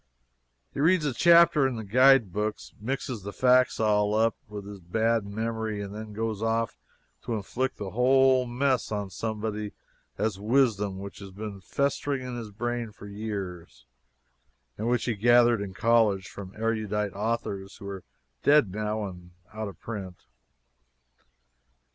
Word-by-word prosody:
He - - -6
reads 165 +2 +4
a 140 - 0
chapter 170 0 +6
in 130 - -3
the 110 - -5
guidebooks, 110 -3 +3
mixes 130 0 -3
the 100 +2 -6
facts 125 +2 +3
all 105 -1 +2
up, 110 0 +3
with 105 -1 -7
his 100 -1 -9
bad 110 +4 0
memory, 110 0 -3
and 100 0 -5
then 110 0 -7
goes 110 -1 -3
off 115 0 0 0.5
to 120 - -2
inflict 125 +5 -2
the 100 -2 -5
whole 130 +1 +4
mess 130 0 0
on 100 -2 -3
somebody 105 -1 -3 0.4
as 105 -3 -1
wisdom 105 -4 +2
which 100 0 -8
has 100 -1 -9
been 100 0 -7
festering 140 +5 -1
in 125 -1 -5
his 115 -3 -6
brain 120 +2 -3
for 100 - -13
years 95 - -6 0.9
and 110 - -3
which 125 0 +1
he 120 - 0
gathered 120 +1 +4
in 95 -2 -6
college 110 -5 +3
from 95 -1 -9
erudite 110 -2 -1
authors 100 -2 -3
who 100 - -9
are 95 -2 -6 0.4
dead 145 -9 +5
now 105 +1 -2
and 90 -2 -9 0.2
out 110 0 -4
of 95 -5 -10
print. 95 -6 -7
110 Hz, 150 wpm, -27 LUFS, 100-120 Hz, 0.9 s, chapter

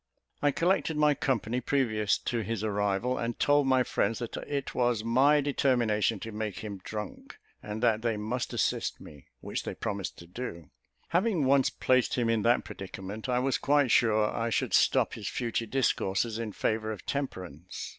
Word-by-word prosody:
I 145 - +4
collected 165 +1 +1
my 150 -1 +4
company 125 -3 -1
previous 110 -6 +1
to 120 - -2
his 110 0 -3
arrival, 105 +4 0
and 115 0 -3
told 145 -1 +3
my 130 -1 +4
friends 110 -1 0
that 120 -2 -5
it 140 -2 -3
was 120 -3 +1
my 135 +6 +4
determination 120 -6 +1
to 115 - -6
make 105 -2 -4
him 100 -3 -6
drunk, 105 -2 -7 0.2
and 105 +2 -5
that 110 -2 +3
they 115 -2 0
must 115 +4 -3
assist - - -1
me, 70 -3 -13
which - - -3
they - - -5
promised 100 -2 -4
to 85 - -11
do. 85 - -7 0.4
Having 180 -3 +2
once 135 0 +4
placed 130 -1 +1
him 120 -2 +1
in 115 -1 +1
that 120 +3 +3
predicament, 100 +4 -7
I 125 - +2
was 130 +1 +1
quite 145 -3 +3
sure 110 -2 +3
I 115 0 -1
should - - -1
stop - - +3
his 105 -3 -6
future 115 -1 -2
discourses 115 -3 0
in 115 -2 -3
favour 110 0 -1
of 105 - -8
temperance. 95 - -5
115 Hz, 175 wpm, -29 LUFS, 105-130 Hz, 0.4 s, I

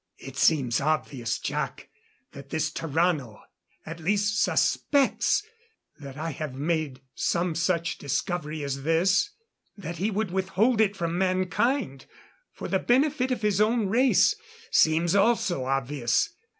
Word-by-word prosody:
"It 135 0 -10
seems 140 -5 +2
obvious, 140 -5 -1
Jac, - - -4 0.4
that 140 0 -12
this 155 0 -1
Tarrano 155 -8 -1 0.4
at 165 +1 -7
least 205 +4 +1
suspects 285 +6 +2 0.6
that 140 -2 -9
I 165 +2 -3
have 145 -2 -6
made 150 -2 -2
some 175 0 0
such 170 +1 -1
discovery 150 +2 -3
as 140 -1 -3
this. 170 - +2 0.5
That 175 -4 -6
he 200 +4 0
would 210 -2 -2
withhold 195 +5 +1
it 205 -2 +2
from 170 -1 -2
mankind, 185 - 0 0.4
for - - -7
the - - +1
benefit 265 +1 +2
of 245 -4 -2
his 210 -1 +2
own 220 -1 +2
race, 250 - +4 0.4
seems 165 +2 +3
also 200 - +2
obvious. 135 - 0
170 Hz, 130 wpm, -26 LUFS, 145-205 Hz, 0.6 s, race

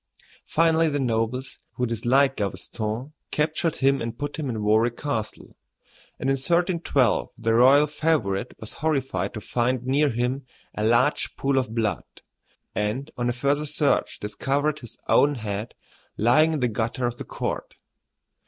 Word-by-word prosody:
Finally 165 0 +3
the 145 -1 -1
nobles, 125 +1 -1
who 125 - -1
disliked 125 +4 +2
Gaveston, 110 +6 -3 0.2
captured 155 +2 0
him 135 0 +2
and 115 0 -4
put 145 +2 -4
him 145 -4 -2
in 110 -3 -3
Warwick 110 +3 +2
Castle, 115 -7 -4 0.6
and - - -2
in 135 - +3
1312 170 -3 +1
the 115 -1 0
royal 135 +5 +6
favorite 145 -9 0
was 110 - -8
horrified 135 - 0
to 105 - -5
find 125 +3 0
near 140 +3 +3
him 125 +2 -2 0.3
a 105 - -3
large 120 +6 +2
pool 135 -1 +1
of 125 -3 -4
blood, 110 -3 0 0.7
and 110 +7 -2
on 120 0 -1
a - - +2
further 140 +5 0
search 145 -1 0
discovered 140 +8 -1
his 120 -3 -10
own 145 0 +4
head 105 -1 -4 0.4
lying 140 +9 +4
in 150 - -2
the 125 - +3
gutter 115 +3 -2
of 120 0 -2
the - - -6
court. - - -4
130 Hz, 155 wpm, -25 LUFS, 115-145 Hz, 0.7 s, royal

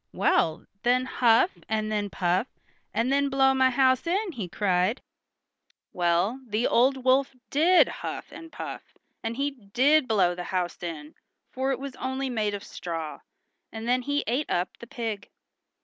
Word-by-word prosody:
"Well, 160 +1 +1 0.2
then 250 +1 +2
huff, 245 +6 +3 0.2
and 215 0 -1
then 205 -1 -1
puff, 185 +5 0 0.4
and 245 +4 0
then 280 0 +2
blow 270 0 +4
my 260 -1 +4
house 260 +3 +2
in!" 385 +3 0
he 215 - -6
cried. 185 +4 +1 0.9
Well, 175 +7 +1
the 220 +2 0
old 260 +2 +2
wolf 265 +1 +3 0.2
did 340 +6 +5
huff - - -6
and 330 -1 -11
puff, - - -6 0.4
and 225 +1 -4
he 285 +1 0
did 260 +5 +2
blow 190 -5 +3
the 175 0 -6
house 180 -2 -2
in, 160 -3 -6 0.4
for 265 +1 -1
it 265 - 0
was 275 0 -7
only 260 0 -3
made 210 -3 0
of 200 - -7
straw, 165 -3 -6 0.5
and 225 +1 -6
then 250 +1 +2
he 285 +3 -1
ate 255 +6 -1
up 175 +1 -1
the 235 - -10
pig. 225 -4 -5
240 Hz, 165 wpm, -27 LUFS, 195-270 Hz, 0.9 s, did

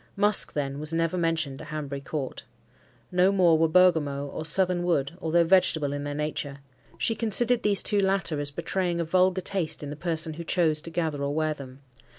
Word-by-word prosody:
Musk, 205 0 +3
then, 140 -1 -3
was 155 +1 -2
never 165 +1 0
mentioned 165 -5 -1
at 155 - -10
Hanbury 145 -3 -5
Court. 140 -1 -6 0.7
No 180 +1 +3
more 180 -4 +4
were 165 +1 +3
bergamot 155 -5 +2
or - - -5
southern 180 +2 +2
wood, 165 -6 0
although 170 +1 +2
vegetable 165 -5 +2
in 145 0 -4
their 145 0 -4
nature. 150 -2 -4 0.4
She 225 - 0
considered 230 +2 +2
these 205 -2 +3
two 205 - +1
latter 190 -6 0
as 145 0 -3
betraying 170 +3 -2
a - - 0
vulgar 185 +2 +2
taste 175 -5 -1
in 145 - -6
the - - -6
person 160 0 -1
who 170 +2 -7
chose 160 -3 +1
to 165 - -8
gather 160 -4 -2
or 140 +1 -2
wear 155 0 0
them. 135 -2 -12
165 Hz, 195 wpm, -26 LUFS, 145-180 Hz, 0.7 s, more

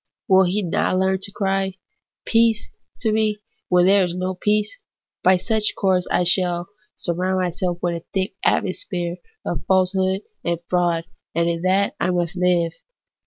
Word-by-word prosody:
Will 190 -2 +6
he 195 +4 0
not 180 +1 0
learn 190 0 +1
to 200 +1 -3
cry, 195 -1 -1 0.2
' - - -66
Peace,' 230 -1 +2 0.3
to 220 - +1
me, 215 -1 +1 0.3
when 180 0 +4
there 195 +1 +5
is 175 -1 -2
no 185 +1 -2
peace? 210 - 0 0.4
By 185 0 +5
such 220 +3 0
a - - -7
course 185 -2 +2
I 180 - +2
shall 175 0 +2 0.3
surround 185 +1 -1
myself 180 -1 -1
with 170 -1 0
a - - -37
thick 190 0 -1
atmosphere 180 -2 -1 0.3
of - - -3
falsehood 190 0 +2 0.2
and 170 0 0
fraud, 175 -2 +1 0.3
and 170 0 +2
in 170 -1 -1
that 190 +2 +2
I - - +1
must 175 0 -1
hve. 175 -2 +2
185 Hz, 165 wpm, -22 LUFS, 175-195 Hz, 0.4 s, Will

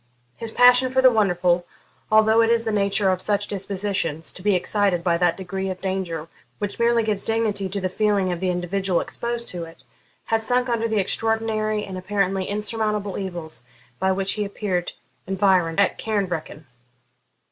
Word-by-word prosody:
His 225 - -1
passion 250 +2 +5
for 260 - +2
the 260 -1 +7
wonderful, 180 -5 +2 0.4
although 220 +1 +5
it 225 - +3
is 230 0 +2
the 220 - 0
nature 200 -1 +2
of 185 0 -1
such 205 +1 0
dispositions 195 -5 -3
to - - -11
be 205 0 +2
excited 185 -1 +1
by 170 -1 +2
that 175 -1 +2
degree 190 0 -4
of 185 -1 -5
danger 185 -4 -3 0.3
which 200 +5 -4
merely 235 0 +3
gives 210 -2 0
dignity 215 -4 0
to 200 +2 -3
the 185 - -1
feeling 200 -1 +1
of 175 - -3
the 185 0 -1
individual 180 +1 0
exposed 235 0 -4
to 175 -2 -5
it, 165 0 -15 0.4
had 225 0 +1
sunk 245 +3 +1
under 230 -1 0
the 220 -1 -1
extraordinary 215 +1 0
and 185 -1 -6
apparently 195 0 -1
insurmountable 210 -1 -2
evils 175 -9 -6 0.4
by 190 - +2
which 190 0 0
he 210 - -2
appeared 200 -3 -3 0.3
environed 190 -3 +2
at 200 - +2
Cairnvreckan. 180 -8 -3
200 Hz, 170 wpm, -23 LUFS, 185-220 Hz, 0.4 s, the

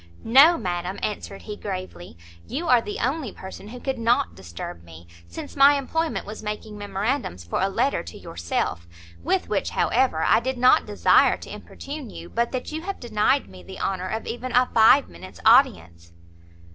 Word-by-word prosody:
"No, 280 +9 +7
madam," 180 -1 -3
answered 200 -1 -4
he, 210 - -6
gravely; 185 - -7 0.3
"you 305 +8 -4
are 245 -4 +5
the 210 - -6
only 260 -2 -2
person 190 +2 -10
who 245 +3 -9
could 265 -1 -3
not 230 - +1
disturb 85 -1 -9
me, 85 0 -14 0.2
since 85 - -9
my 280 +1 +7
employment 320 +4 -2
was 215 +1 -8
making 210 0 -6
memorandums 205 - -3
for 85 - -2
a 195 - +2
letter 270 +8 0
to 85 - -10
yourself; 85 0 -3 0.3
with 370 +3 0
which, - - -1
however, 205 -12 +1
I - - +4
did 260 +2 -3
not 250 +1 +4
desire - - +4
to - - -10
importune 280 -3 -8
you, 170 -3 -10
but 235 +1 -1
that 255 +2 -4
you 315 +1 -4
have 390 +3 -5
denied 240 +3 +1
me 95 -1 -13
the 90 - -11
honour 185 -1 -2
of 220 +3 -4
even 250 +2 -5
a 250 +1 +5
five 225 +5 +6
minutes' 95 +2 -12
audience." 85 0 +3
215 Hz, 180 wpm, -24 LUFS, 170-260 Hz, 0.3 s, No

